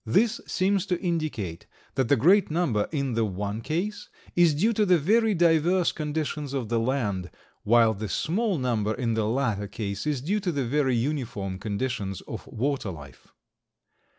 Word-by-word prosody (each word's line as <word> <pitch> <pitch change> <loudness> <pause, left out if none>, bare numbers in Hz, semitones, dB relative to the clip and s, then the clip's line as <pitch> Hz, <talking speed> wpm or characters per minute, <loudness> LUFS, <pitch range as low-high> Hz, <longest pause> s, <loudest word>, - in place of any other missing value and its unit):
This 215 - +2
seems 195 +1 +1
to 180 -3 0
indicate 155 - -3 0.3
that 130 -3 0
the 140 - +6
great 180 - +4
number 150 -11 0
in 140 -5 -1
the 115 0 +1
one 100 +1 -3
case 190 - -3 0.3
is 170 -4 +5
due 215 +10 +2
to 215 - +2
the 180 -3 +5
very 215 +7 +3
diverse 170 +1 +3
conditions 150 -2 -3
of 125 -6 -2
the 115 -1 +1
land, 110 -7 -1 0.3
while 115 0 +4
the 105 0 -5
small 195 - 0
number 110 -5 0
in 115 -3 -1
the 110 -1 0
latter 110 -4 0
case 100 +3 -4
is 145 -4 0
due 195 +10 0
to 190 -3 -1
the 140 -5 -1
very 135 0 +1
uniform 115 -8 -2
conditions 100 -2 -3
of - - -8
water 135 -2 -2
life. 70 -7 -11
135 Hz, 170 wpm, -26 LUFS, 110-170 Hz, 0.3 s, the